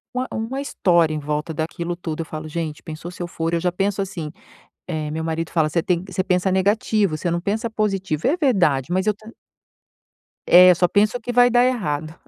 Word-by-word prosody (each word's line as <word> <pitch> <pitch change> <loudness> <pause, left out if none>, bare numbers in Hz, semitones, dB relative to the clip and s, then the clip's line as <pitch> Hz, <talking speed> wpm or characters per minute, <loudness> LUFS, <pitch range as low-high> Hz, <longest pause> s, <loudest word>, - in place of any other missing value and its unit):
uma 255 +1 -1
uma 230 +5 -3
história 170 - +2
em 155 - -2
volta 150 +2 -3
daquilo 170 +2 -3
tudo. 165 -2 -5
Eu - - -5
falo: 155 0 -7
"Gente, 155 -1 -4
pensou 160 +1 -8
se 180 - -10
eu - - -4
for" 165 -1 -3
Eu 170 - +2
já 180 0 +1
penso 195 +2 -1
assim, 170 -6 -5 0.6
eh, 155 -3 -3
meu 160 +1 -3
marido 165 0 -3
fala: 160 -3 +2
"Você 165 +1 0
tem 180 -1 0
você 185 0 -2
pensa 185 0 +1
negativo, 200 -2 +1
você 175 - -2
não 170 0 -1
pensa 220 +5 -2
positivo". 195 -8 -1
E - - +4
é 340 - 0
verdade, 175 - +2
mas 190 +2 0
eu 215 - +3
tam 215 +2 -14 1.2
É, 180 +1 +8
eu 180 - +6
só 180 +1 +3
penso 210 +6 +2
que 245 +1 -5
vai 245 0 +6
dar 245 +1 +4
errado, 160 - -2
180 Hz, 220 wpm, -21 LUFS, 160-205 Hz, 1.2 s, É